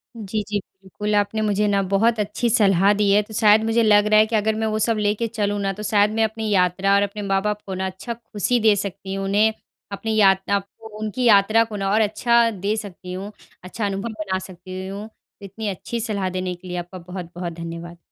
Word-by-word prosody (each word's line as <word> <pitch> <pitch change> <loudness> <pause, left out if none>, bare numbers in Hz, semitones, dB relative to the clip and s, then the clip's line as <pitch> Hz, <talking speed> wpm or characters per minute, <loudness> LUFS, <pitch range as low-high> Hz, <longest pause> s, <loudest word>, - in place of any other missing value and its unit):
जी, 215 -1 -3
जी, 205 -1 0
बिल्कुल। 195 +2 -5
आपने 205 +1 +1
मुझे 210 -1 +1
ना 200 -1 +2
बहुत 225 +3 +3
अच्छी 210 +4 -1
सलाह 195 -2 +4
दी 205 -1 +3
है। 205 +1 +5
तो 210 +1 -12
शायद 215 0 +5
मुझे 225 +1 +2
लग 205 -1 +5
रहा 215 0 +5
है 215 - +6
कि 225 +1 -2
अगर 215 0 +1
मैं 220 0 -1
वो - - 0
सब 225 +1 +1
लेके 210 +2 0
चलूँ 205 -2 -2
ना 195 0 -1
तो 210 +2 -8
शायद 205 0 +3
मैं 225 - +2
अपनी 220 0 -2
यात्रा 190 0 +2
और 200 - +4
अपने 205 +1 -3
माँ-बाप 205 +1 -1
को 195 - -5
ना 190 +1 -2
अच्छा 190 +6 -5
खुशी 230 +1 -1
दे 215 -2 +4
सकती 195 -1 -5
हूँ 195 0 -3
उन्हें 210 +3 +3 0.4
अपनी 220 +2 -3
यात्रा 195 -1 +3
आपको 210 +2 -7
उनकी 215 +4 -3
यात्रा 215 +1 +5
को 225 -2 -8
ना 195 -1 -1
और 220 - +4
अच्छा 235 +2 +3
दे 200 +1 -2
सकती 185 -4 -7
हूँ, 195 +3 -6 0.3
अच्छा 205 +4 -4
अनुभव 195 +3 -3
बना 210 -4 -3
सकती 185 0 -8
हूँ। 200 +3 -7 0.3
इतनी 200 +2 -6
अच्छी 200 +5 -5
सलाह 205 -4 -2
देने 185 0 -3
के 175 +1 -14
लिए 180 0 -4
आपका 175 +1 -6
बहुत-बहुत 175 -1 -7
धन्यवाद। 170 +1 -7
205 Hz, 220 wpm, -22 LUFS, 190-215 Hz, 0.4 s, है